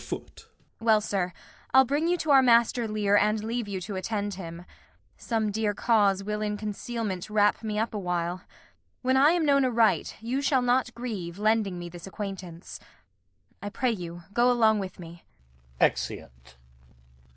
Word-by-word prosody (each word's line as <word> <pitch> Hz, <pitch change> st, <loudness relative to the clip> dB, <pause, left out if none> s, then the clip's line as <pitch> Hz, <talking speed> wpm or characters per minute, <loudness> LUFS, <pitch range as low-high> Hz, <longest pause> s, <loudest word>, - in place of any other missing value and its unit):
Well, 225 Hz, -1 st, +4 dB
sir, 195 Hz, -4 st, -2 dB, 0.4 s
I'll 265 Hz, 0 st, +8 dB
bring 290 Hz, +5 st, 0 dB
you 355 Hz, +1 st, +2 dB
to 315 Hz, -3 st, -1 dB
our 270 Hz, -1 st, +8 dB
master 235 Hz, -1 st, +3 dB
Lear 210 Hz, -1 st, +1 dB
And 210 Hz, +1 st, +2 dB
leave 230 Hz, 0 st, -3 dB
you 195 Hz, -2 st, -4 dB
to 200 Hz, +2 st, -6 dB
attend 205 Hz, +1 st, -2 dB
him. 170 Hz, -2 st, -8 dB, 0.5 s
Some 220 Hz, -3 st, -1 dB
dear 210 Hz, 0 st, -1 dB
cause 200 Hz, -4 st, +2 dB
Will 210 Hz, +1 st, -3 dB
in 210 Hz, -1 st, -2 dB
concealment 210 Hz, -2 st, -4 dB
wrap 210 Hz, -1 st, +2 dB
me 215 Hz, -2 st, -3 dB
up 225 Hz, +1 st, -1 dB
awhile. 180 Hz, -2 st, -2 dB, 0.6 s
When 260 Hz, +1 st, +2 dB
I 285 Hz, +5 st, +5 dB
am 345 Hz, -3 st, +1 dB
known 280 Hz, -1 st, +4 dB
aright, 235 Hz, -3 st, +2 dB
you 245 Hz, +5 st, -2 dB
shall 270 Hz, -2 st, +2 dB
not 245 Hz, 0 st, +2 dB
grieve 205 Hz, -8 st, -5 dB
Lending 215 Hz, -3 st, +1 dB
me 175 Hz, 0 st, -6 dB
this 175 Hz, +1 st, -10 dB
acquaintance. 190 Hz, -4 st, -7 dB, 0.8 s
I 205 Hz, -, -4 dB
pray 240 Hz, +4 st, 0 dB
you 175 Hz, -4 st, -6 dB
go 240 Hz, +2 st, +4 dB
Along 220 Hz, -3 st, +4 dB
with 190 Hz, -2 st, -6 dB
me. 170 Hz, -1 st, -11 dB, 0.6 s
Exeunt. 60 Hz, 0 st, -2 dB
210 Hz, 160 wpm, -27 LUFS, 190-235 Hz, 0.8 s, I'll